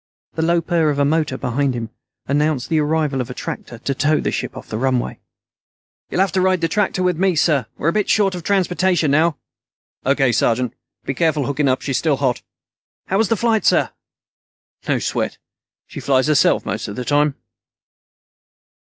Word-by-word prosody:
The 160 Hz, -, -2 dB
low 170 Hz, +1 st, +2 dB
purr 165 Hz, -2 st, +1 dB
of 145 Hz, -, -1 dB
a 140 Hz, -, +3 dB
motor 150 Hz, -3 st, 0 dB
behind 130 Hz, +2 st, -1 dB
him 115 Hz, -1 st, -5 dB, 0.4 s
announced 145 Hz, -2 st, 0 dB
the 160 Hz, -, +2 dB
arrival 150 Hz, -3 st, 0 dB
of 125 Hz, -, -5 dB
a 125 Hz, -, -7 dB
tractor 120 Hz, -, -6 dB
to 140 Hz, +4 st, -2 dB
tow 150 Hz, +3 st, +2 dB
the -, -, -1 dB
ship -, -, -4 dB
off -, -, -9 dB
the 110 Hz, -, -4 dB
runway. 130 Hz, -1 st, -1 dB, 0.9 s
"You'll 185 Hz, -, 0 dB
have 195 Hz, -2 st, +2 dB
to 185 Hz, -, +1 dB
ride 185 Hz, -1 st, +2 dB
the 165 Hz, -, +2 dB
tractor 190 Hz, 0 st, 0 dB
back -, -, +1 dB
with 180 Hz, -3 st, +1 dB
me, 190 Hz, -2 st, +2 dB
sir. 150 Hz, -6 st, +2 dB
We're 160 Hz, -, +1 dB
a -, -, -1 dB
bit 210 Hz, -2 st, 0 dB
short 200 Hz, -3 st, +3 dB
of 180 Hz, -, -5 dB
transportation 180 Hz, -3 st, +1 dB
now." 155 Hz, +1 st, +3 dB, 0.7 s
"O.K., 135 Hz, -2 st, +2 dB
sergeant. 120 Hz, +1 st, +1 dB, 0.3 s
Be 135 Hz, -, -1 dB
careful 155 Hz, -2 st, +1 dB
hooking 140 Hz, +1 st, 0 dB
up. 130 Hz, -, 0 dB
She's 135 Hz, -3 st, 0 dB
still 155 Hz, -4 st, +1 dB
hot." 130 Hz, -3 st, 0 dB, 0.7 s
"How 195 Hz, -, +1 dB
was 220 Hz, -, +2 dB
the 225 Hz, -, +2 dB
flight, 225 Hz, 0 st, +1 dB
sir?" -, -, +3 dB, 1.0 s
"No -, -, +2 dB
sweat. -, -, -2 dB, 0.5 s
She -, -, -9 dB
flies 130 Hz, -2 st, +2 dB
herself 150 Hz, -2 st, +3 dB
most 105 Hz, +3 st, -3 dB
of 100 Hz, -, -6 dB
the 125 Hz, -, -5 dB
time." 145 Hz, +2 st, +2 dB
150 Hz, 195 wpm, -20 LUFS, 135-175 Hz, 1.0 s, a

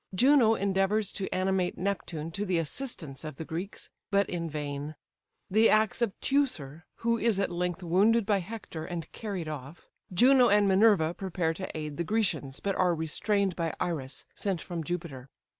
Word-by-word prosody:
Juno 250 Hz, 0 st, +5 dB
endeavours 200 Hz, +1 st, +1 dB
to 195 Hz, -, -4 dB
animate 185 Hz, -1 st, 0 dB
Neptune 170 Hz, -4 st, -3 dB
to 200 Hz, +5 st, -3 dB
the 185 Hz, -4 st, 0 dB
assistance 165 Hz, -, -3 dB
of 155 Hz, -3 st, -6 dB
the 160 Hz, -, -6 dB
Greeks, 175 Hz, +7 st, -5 dB, 0.2 s
but 200 Hz, -1 st, +2 dB
in 170 Hz, -2 st, -3 dB
vain. 145 Hz, 0 st, -4 dB, 0.5 s
The 220 Hz, +4 st, +4 dB
acts 215 Hz, +2 st, +3 dB
of 225 Hz, -5 st, -1 dB
Teucer, 175 Hz, -, 0 dB
who 230 Hz, 0 st, 0 dB
is 220 Hz, -3 st, +2 dB
at 195 Hz, -, 0 dB
length 180 Hz, +1 st, -2 dB
wounded 200 Hz, +6 st, +3 dB
by 205 Hz, -1 st, +2 dB
Hector, 185 Hz, -4 st, -7 dB
and 170 Hz, -1 st, -6 dB
carried 195 Hz, -7 st, -5 dB
off. 150 Hz, +1 st, -8 dB, 0.2 s
Juno 250 Hz, +6 st, +6 dB
and 205 Hz, 0 st, +4 dB
Minerva 190 Hz, -4 st, +4 dB
prepare 175 Hz, -3 st, -1 dB
to 185 Hz, +3 st, -6 dB
aid 150 Hz, -2 st, -5 dB
the 170 Hz, -, 0 dB
Grecians, 170 Hz, -9 st, -1 dB
but 200 Hz, -, -1 dB
are 180 Hz, -2 st, +3 dB
restrained 195 Hz, +4 st, 0 dB
by 165 Hz, -2 st, -2 dB
Iris, 145 Hz, -6 st, -3 dB
sent 195 Hz, -4 st, -2 dB
from 170 Hz, -2 st, -5 dB
Jupiter. 150 Hz, -6 st, -5 dB
185 Hz, 170 wpm, -29 LUFS, 160-205 Hz, 0.5 s, Juno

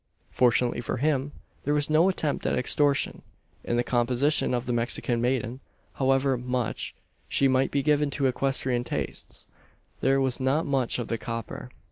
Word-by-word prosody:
Fortunately 120 Hz, 0 st, +2 dB
for 120 Hz, -, -3 dB
him, 140 Hz, 0 st, 0 dB, 0.3 s
there 145 Hz, +2 st, +1 dB
was 145 Hz, -1 st, +1 dB
no 155 Hz, +4 st, +4 dB
attempt 155 Hz, -6 st, -1 dB
at -, -, +1 dB
extortion. 140 Hz, +2 st, +1 dB, 0.4 s
In 120 Hz, -, -1 dB
the 120 Hz, -, +2 dB
composition 125 Hz, +5 st, +2 dB
of 125 Hz, 0 st, -1 dB
the 125 Hz, -, -1 dB
Mexican 120 Hz, 0 st, 0 dB
maiden, 125 Hz, 0 st, -1 dB, 0.3 s
however 135 Hz, -1 st, +2 dB
much 125 Hz, -2 st, -3 dB, 0.3 s
she 140 Hz, -, +3 dB
might 130 Hz, 0 st, +2 dB
be 140 Hz, -1 st, 0 dB
given 150 Hz, 0 st, +2 dB
to 140 Hz, 0 st, -1 dB
equestrian 130 Hz, -1 st, +1 dB
tastes, -, -, -4 dB, 0.5 s
there 135 Hz, +1 st, +3 dB
was 130 Hz, -1 st, 0 dB
not 135 Hz, +5 st, +1 dB
much 135 Hz, -4 st, 0 dB
of 120 Hz, -, -3 dB
the 115 Hz, -, -2 dB
"coper." 115 Hz, -2 st, -5 dB
130 Hz, 160 wpm, -27 LUFS, 120-140 Hz, 0.5 s, no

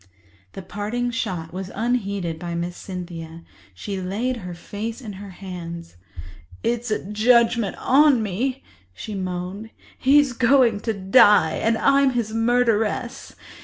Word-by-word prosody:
This 195 Hz, -, -8 dB
parting 225 Hz, +5 st, -2 dB
shot 180 Hz, -8 st, -4 dB
was 190 Hz, 0 st, -5 dB
unheeded 200 Hz, -8 st, -1 dB
by 170 Hz, 0 st, -5 dB
Miss 175 Hz, +1 st, -3 dB
Cynthia. 170 Hz, -3 st, -8 dB, 0.3 s
She 195 Hz, -, -5 dB
laid 225 Hz, +8 st, -2 dB
her 180 Hz, -5 st, -7 dB
face 215 Hz, +7 st, -6 dB
in 220 Hz, -6 st, -8 dB
her 200 Hz, +1 st, -9 dB
hands. 175 Hz, -, -8 dB, 0.7 s
"It's 235 Hz, 0 st, -1 dB
a 215 Hz, -, -2 dB
judgement 230 Hz, +1 st, +3 dB
on 275 Hz, -3 st, +4 dB
me," 245 Hz, +7 st, -2 dB, 0.3 s
she 215 Hz, -, -7 dB
moaned. 185 Hz, +2 st, -5 dB, 0.3 s
"He's 280 Hz, 0 st, +4 dB
going 240 Hz, -3 st, +4 dB
to 225 Hz, +1 st, -2 dB
die, 195 Hz, -3 st, +5 dB
and 225 Hz, 0 st, +1 dB
I'm 275 Hz, +1 st, +4 dB
his 225 Hz, -3 st, -2 dB
murderess. 235 Hz, +1 st, 0 dB
210 Hz, 130 wpm, -23 LUFS, 185-240 Hz, 0.7 s, die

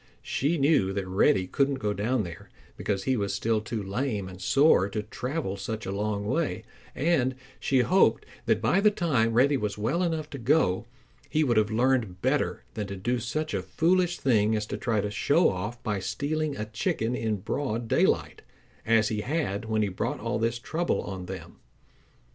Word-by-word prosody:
She 150 Hz, +5 st, 0 dB
knew 140 Hz, -10 st, +3 dB
that 100 Hz, -1 st, -2 dB
Reddy 95 Hz, 0 st, +3 dB
couldn't 140 Hz, +8 st, +1 dB
go 105 Hz, -5 st, -1 dB
down 110 Hz, +3 st, 0 dB
there, 85 Hz, -2 st, -9 dB, 0.3 s
because 100 Hz, -2 st, -2 dB
he 130 Hz, -, +1 dB
was 100 Hz, -4 st, -1 dB
still 110 Hz, -1 st, 0 dB
too 110 Hz, -1 st, -4 dB
lame 100 Hz, 0 st, -2 dB
and 95 Hz, 0 st, -10 dB
sore 135 Hz, -, +4 dB
to 105 Hz, +1 st, -3 dB
travel 125 Hz, 0 st, -4 dB
such 110 Hz, +2 st, -5 dB
a 95 Hz, -, -3 dB
long 100 Hz, 0 st, -2 dB
way, 105 Hz, -, -1 dB, 0.3 s
and 130 Hz, -4 st, +1 dB, 0.2 s
she 130 Hz, -2 st, +2 dB
hoped 185 Hz, +9 st, +3 dB, 0.2 s
that -, -, +2 dB
by 195 Hz, -, +3 dB
the 210 Hz, -, +6 dB
time 135 Hz, -, +1 dB
Reddy 135 Hz, +4 st, +4 dB
was 105 Hz, -4 st, -3 dB
well 125 Hz, -, 0 dB
enough 160 Hz, -4 st, -1 dB
to 140 Hz, -, -6 dB
go, 115 Hz, -, +2 dB, 0.4 s
he 155 Hz, +2 st, +2 dB
would 120 Hz, -6 st, +2 dB
have 105 Hz, -1 st, +3 dB
learned 115 Hz, -5 st, +1 dB
better -, -, 0 dB
than 105 Hz, -2 st, -4 dB
to 100 Hz, -, -5 dB
do 120 Hz, +6 st, -1 dB
such 150 Hz, +6 st, -3 dB
a 100 Hz, -, 0 dB
foolish 175 Hz, -, +1 dB
thing 110 Hz, -4 st, +2 dB
as 105 Hz, -1 st, -1 dB
to -, -, -4 dB
try 110 Hz, -4 st, 0 dB
to 105 Hz, -, -3 dB
show 145 Hz, -, +3 dB
off 105 Hz, +6 st, -5 dB
by 105 Hz, -4 st, -1 dB
stealing 145 Hz, +7 st, -2 dB
a 105 Hz, -, -3 dB
chicken 110 Hz, +2 st, -1 dB
in 110 Hz, -3 st, -1 dB
broad 115 Hz, +3 st, -3 dB
daylight, -, -, +1 dB, 0.5 s
as 110 Hz, -1 st, +4 dB
he 105 Hz, -1 st, -2 dB
had 120 Hz, -7 st, -2 dB
when 110 Hz, -1 st, +1 dB
he -, -, +1 dB
brought 95 Hz, -, -3 dB
all 105 Hz, -, -2 dB
this 115 Hz, +1 st, 0 dB
trouble 165 Hz, +8 st, -1 dB
on 95 Hz, -2 st, -6 dB
them. 95 Hz, 0 st, -8 dB
115 Hz, 190 wpm, -27 LUFS, 100-140 Hz, 0.5 s, the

